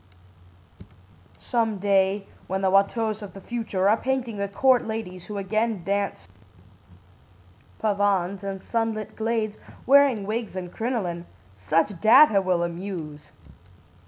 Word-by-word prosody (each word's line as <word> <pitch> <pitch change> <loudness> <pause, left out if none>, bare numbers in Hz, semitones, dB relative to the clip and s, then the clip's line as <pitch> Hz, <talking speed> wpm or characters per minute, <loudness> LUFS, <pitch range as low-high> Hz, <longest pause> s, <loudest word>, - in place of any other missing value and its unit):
Some 225 -3 -1
day, 195 0 +1 0.2
when 190 +1 -2
the 190 - +3
Wateaus 215 +2 +1
of 205 - -9
the - - -8
future 205 -3 -2
are 210 - +5
painting 250 -3 -2
the 200 0 -2
court 250 +5 +2
ladies 205 -5 -5
who 210 - -6
again 215 0 -1
dance 195 - -2 1.5
pavanes 200 -3 0
in 195 -1 -5
sunlit 225 -2 -3
glades, 220 -1 -2 0.3
wearing 270 -6 +5
wigs 220 -1 -3
and 180 -2 -5
crinoline, 195 -8 -3 0.3
such 165 - 0
data 220 -2 +7
will 180 -2 +1
amuse. 170 -4 -6
200 Hz, 120 wpm, -25 LUFS, 190-225 Hz, 1.5 s, data